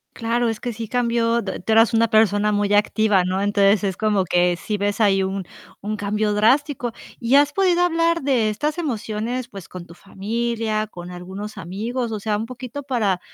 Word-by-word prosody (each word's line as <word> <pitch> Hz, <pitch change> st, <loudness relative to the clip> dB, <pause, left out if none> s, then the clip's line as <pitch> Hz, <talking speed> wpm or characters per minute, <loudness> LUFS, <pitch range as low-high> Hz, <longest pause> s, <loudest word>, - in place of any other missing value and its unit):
Claro, 235 Hz, +1 st, 0 dB
es 225 Hz, -, -2 dB
que 245 Hz, -, -4 dB
sí 225 Hz, 0 st, -6 dB
cambió 235 Hz, -1 st, +1 dB
d 190 Hz, -3 st, -5 dB
tú 220 Hz, -, -2 dB
eras 225 Hz, +1 st, +5 dB
una 230 Hz, 0 st, +3 dB
persona 210 Hz, -1 st, +3 dB
muy 205 Hz, 0 st, +1 dB
activa, 210 Hz, -2 st, +3 dB
¿no?, 185 Hz, +2 st, -1 dB
entonces 200 Hz, 0 st, +3 dB
es 190 Hz, -2 st, -1 dB
como 210 Hz, -3 st, +1 dB
que 175 Hz, 0 st, +2 dB
sí 210 Hz, +4 st, -3 dB
ves 205 Hz, +1 st, -2 dB
ahí 195 Hz, -3 st, +3 dB
un, 190 Hz, 0 st, -3 dB, 0.4 s
un 215 Hz, +1 st, -3 dB
cambio 210 Hz, +1 st, -1 dB
drástico. 245 Hz, +2 st, +2 dB, 0.3 s
¿Y 240 Hz, +3 st, +3 dB
has 290 Hz, 0 st, +4 dB
podido 360 Hz, 0 st, +2 dB
hablar 335 Hz, -1 st, +1 dB
de 250 Hz, -6 st, +2 dB
estas 295 Hz, +10 st, -2 dB
emociones, 240 Hz, -3 st, -3 dB
pues 195 Hz, -6 st, -10 dB
con 180 Hz, -2 st, -9 dB
tu 170 Hz, -, -14 dB
familia, 215 Hz, +3 st, -3 dB
con 175 Hz, -2 st, -9 dB
algunos 190 Hz, +4 st, -8 dB
amigos? 225 Hz, +8 st, -4 dB
O 215 Hz, -, -3 dB
sea, 210 Hz, 0 st, -1 dB
un 220 Hz, +2 st, -3 dB
poquito 255 Hz, +3 st, -7 dB
para, 215 Hz, -9 st, 0 dB
215 Hz, 195 wpm, -22 LUFS, 200-240 Hz, 0.4 s, eras